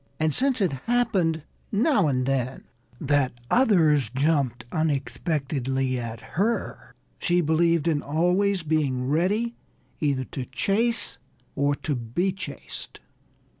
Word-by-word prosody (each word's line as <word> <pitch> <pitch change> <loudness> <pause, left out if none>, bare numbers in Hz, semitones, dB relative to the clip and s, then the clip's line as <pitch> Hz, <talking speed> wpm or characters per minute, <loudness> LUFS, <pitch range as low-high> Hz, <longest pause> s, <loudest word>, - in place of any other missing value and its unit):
And 155 -1 +1
since 260 - +3
it 185 - +2 0.2
happened, 200 -10 +1 0.3
now 215 - +3
and 130 -3 +1
then, 130 -1 -1 0.4
that 145 -2 +1 0.2
others 160 - +4
jumped 135 -3 0
unexpectedly 135 -4 -1
at 115 -1 -5
her, 215 +7 -2 0.2
she 175 -1 +2
believed 165 0 +2
in 155 -3 +1
always 180 +5 +1
being 145 -5 0
ready 200 - +1 0.5
either 140 -3 0
to 130 0 -6
chase 215 - +1 0.4
or 140 0 +2
to 145 - -3
be 125 +10 -1
chased. 190 0 -7
155 Hz, 115 wpm, -25 LUFS, 135-190 Hz, 0.5 s, others